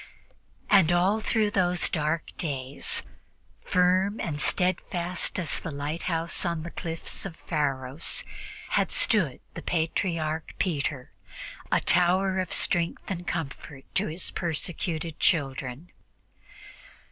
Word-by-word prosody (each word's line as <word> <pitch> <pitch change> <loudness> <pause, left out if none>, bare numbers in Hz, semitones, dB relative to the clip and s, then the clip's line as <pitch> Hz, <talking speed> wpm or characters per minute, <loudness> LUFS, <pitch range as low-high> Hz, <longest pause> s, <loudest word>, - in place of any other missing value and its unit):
And 190 -5 +6
all 185 +5 +3
through 215 -1 +1
those 180 -3 +3
dark 155 0 -1
days, 135 -4 -1 0.6
firm 185 +3 +3
and 150 -3 -2
steadfast 180 -1 +1
as 175 -4 +2
the - - -5
lighthouse 165 +3 -1
on 170 -2 -1
the 170 - -6
cliffs 165 -1 -4
of 195 -4 -5
Pharos, 140 -2 -1 0.5
had - - +2
stood 175 - +2
the - - -6
Patriarch 160 -1 -1
Peter, 145 -6 -1 0.6
a - - +4
tower 185 +2 +3
of 185 -1 -2
strength 170 +2 -1
and 175 -1 -4
comfort 140 -3 -5
to - - +2
his 160 +4 -4
persecuted 165 -1 -2
children. 135 0 0
170 Hz, 110 wpm, -27 LUFS, 150-180 Hz, 0.6 s, And